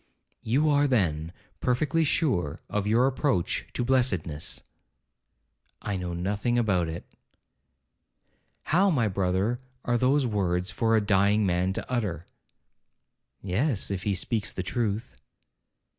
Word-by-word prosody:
'You 135 +8 +1
are, 145 -1 +4
then, 85 - 0 0.3
perfectly 150 +6 +1
sure 130 - 0
of 105 -1 -2
your 115 +4 +4
approach 135 - 0
to 120 - -1
blessedness?' 95 - 0 1.2
'I 100 -2 -2
know 90 -1 -4
nothing 100 +7 -1
about 95 -8 +1
it.' 80 +1 -6 1.6
'How, 185 +5 +3
my 125 - +2
brother, 95 +4 0 0.3
are 120 -1 +1
those 135 +2 +3
words 95 -4 0
for 115 +3 +1
a 110 - +4
dying 100 +1 +3
man 90 0 +1
to - - -5
utter?' 100 -10 -2 1.2
'Yes, 100 - 0
if 95 -2 -2
he 100 0 0
speaks 105 +3 -1
the 95 - -4
truth.' 110 +2 -2
105 Hz, 125 wpm, -27 LUFS, 90-125 Hz, 1.6 s, are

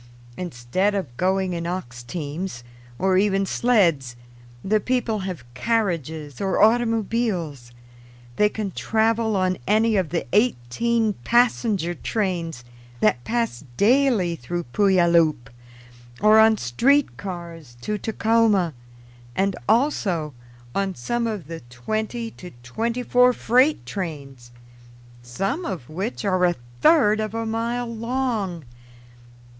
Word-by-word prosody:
Instead 180 +6 -1
of 165 -11 -4
going 185 +3 0
in 170 0 -3
ox 120 -10 -5
teams, 150 +1 -5 0.3
or 190 0 +2
even 195 -1 +2
sleds, 170 - +2 0.5
the 215 +2 +2
people 240 -2 -1
have 185 -9 -5
carriages 160 - -2
or 195 -1 0
automobiles; 220 - +1 0.7
they 210 - +4
can 210 -2 -4
travel 225 +2 +1
on 185 -1 0
any 220 +1 +3
of 185 -5 +1
the 170 - -2
eighteen 220 - +1
passenger 220 - +2
trains 175 - -3 0.4
that 120 +3 +2
pass 230 - -2
daily 225 -6 +3
through 175 +5 -4
Puyallup, 170 - +3 0.7
or 215 +1 +6
on 220 0 +6
street 255 - +2
cars 170 -9 -8
to 210 - -3
Tacoma, 220 -6 +2 0.6
and 195 -1 +1
also 195 - +1 0.4
on 195 -1 -1
some 235 - -2
of 210 -8 -4
the 165 +2 -7
twenty 220 - -3
to 180 - -11
twenty 230 - -2
four 250 0 +4
freight 255 +6 +2
trains, 140 -10 -6 0.7
some 195 - -3
of 175 - -5
which 200 +7 -4
are 185 -2 +1
a 175 -1 +2 0.3
third 220 -10 +5
of 215 0 -3
a 225 0 -2
mile 230 +2 -2
long. 225 - -2
195 Hz, 120 wpm, -23 LUFS, 165-225 Hz, 0.7 s, or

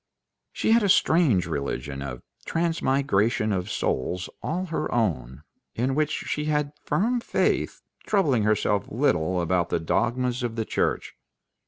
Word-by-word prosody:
She - - 0
had 230 +1 +6
a 200 - +1
strange 160 - +4
religion 70 -3 -4
of 65 -3 -6 0.2
transmigration 135 -10 +1
of 95 +1 -2
souls 90 +5 -2
all 180 +4 -2
her 165 -3 -3
own, 75 - -1 0.3
in 125 +3 0
which 150 +1 +1
she 150 - -2
had 150 -1 0
firm 240 +6 +1
faith, - - 0 0.2
troubling 150 - +2
herself 105 -1 +1
little 95 - +1
about 85 0 +1
the - - 0
dogmas 120 +8 0
of 120 -2 -3
the 110 -1 -2
Church. - - -1
115 Hz, 140 wpm, -25 LUFS, 90-150 Hz, 0.3 s, had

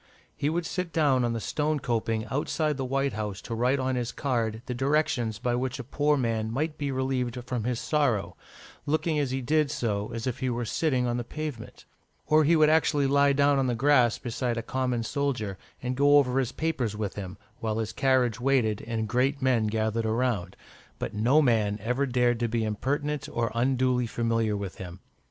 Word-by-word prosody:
He 145 - 0
would 170 +2 -1
sit 180 -1 -3
down 140 -6 +3
on 120 -1 0
the 115 - -2
stone 150 +6 -1
coping 115 -3 -1
outside 150 +2 0
the 135 - -3
White 135 +1 0
House 105 -2 -4
to 115 - -5
write 125 +4 +2
on 130 -1 -1
his 125 -2 -2
card 115 -5 -2
the 125 - -3
directions 130 -4 0
by 120 +3 -1
which 125 +1 -1
a 130 - -6
poor 145 +4 +1
man 115 -3 -1
might 150 +6 -1
be 145 -1 -3
relieved 130 -2 -1
from 125 -4 -3
his 125 -2 -1
sorrow, 140 -10 0 0.5
looking 155 +1 +1
as 140 -3 0
he 130 +1 -2
did 150 +3 +2
so 105 -4 -2
as 115 -1 -4
if 130 0 -2
he 130 -1 -1
were 120 0 -2
sitting 130 +1 0
on 120 0 0
the 120 - -2
pavement; 145 -2 -7 0.4
or 155 0 +4
he 165 +3 +4
would 155 -1 +5
actually 150 -2 +3
lie 140 +1 +4
down 140 0 +3
on 130 - +1
the 120 - 0
grass 125 -2 +4
beside 120 0 -3
a 115 - -2
common 125 -1 -1
soldier, 125 -6 -2 0.3
and 125 +1 -2
go 145 +2 +5
over 135 -2 +3
his 130 -2 -1
papers 130 -9 -2
with 105 -2 -3
him, 95 -1 -7 0.2
while 110 -1 -2
his 110 0 -3
carriage 130 -3 +2
waited, 125 -5 +1
and 110 -2 -2
great 130 +5 +1
men 125 -5 +2
gathered 110 +1 0
around; 110 -5 -1 0.4
but - - -4
no 125 +9 +3
man 110 -5 +2
ever 125 +6 0
dared 120 -2 +2
to 120 - +1
be 115 0 -1
impertinent, 140 +7 -2
or 115 -2 -1
unduly 125 0 +1
familiar 115 -2 0
with 100 -2 -6
him. 90 -1 -8
125 Hz, 200 wpm, -27 LUFS, 115-140 Hz, 0.5 s, would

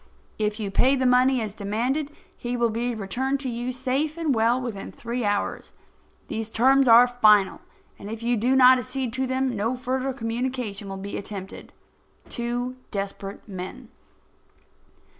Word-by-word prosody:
If 210 0 -1
you 205 -2 -3
pay 260 +7 +4
the 260 -1 0
money 250 0 +4
as 215 -3 -4
demanded, 235 +9 -1 0.3
he 245 0 -4
will 235 -1 +2
be 235 +2 -2
returned 255 +7 -2
to 265 - -3
you 240 +1 -3
safe 265 +5 -1
and 320 -4 +1
well 230 +2 +2
within 230 -6 -5
three 235 +1 -4
hours. 205 -1 -2 0.5
These 220 0 -4
terms 265 +4 +4
are 235 +1 +9
final, 215 -5 +4 0.4
and 200 - -8
if 225 +1 -6
you 240 +1 +2
do 245 +4 +2
not 255 0 +7
accede 255 -1 -4
to 260 0 -1
them 260 -1 0
no 225 +5 -1
further 260 +2 -2
communication 230 -4 -3
will 195 - -5
be 200 +1 -5
attempted. 195 -1 -8 0.6
TWO 245 +1 -3
DESPERATE 195 0 -5
MEN. 200 +6 -8
240 Hz, 160 wpm, -25 LUFS, 215-255 Hz, 0.6 s, are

